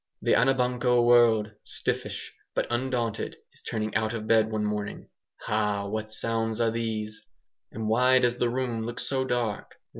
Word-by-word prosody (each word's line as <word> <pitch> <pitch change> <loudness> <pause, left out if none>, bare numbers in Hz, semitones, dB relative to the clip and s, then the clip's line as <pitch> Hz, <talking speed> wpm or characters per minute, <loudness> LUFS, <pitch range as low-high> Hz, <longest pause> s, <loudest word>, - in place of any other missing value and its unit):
The - - +3
Anabanco 125 -2 +3
world 115 -3 +5
stiffish - - -3 0.2
but - - +1
undaunted 120 -2 -2 0.2
is - - -15
turning 110 -1 -3
out 110 +1 0
of 110 -2 -4
bed 110 0 +4
one 110 -1 -1
morning. 105 -1 -4 0.3
Ha! 105 -2 0
what 110 +1 -4
sounds 115 0 -1
are 115 -1 +2
these? 110 -2 -3 0.5
And 110 0 -4
why 125 +4 +4
does 120 -1 +2
the 120 - +2
room 120 -2 -2
look 120 +1 -5
so 130 -1 -1
dark? 120 -5 -2
115 Hz, 155 wpm, -27 LUFS, 110-120 Hz, 0.5 s, world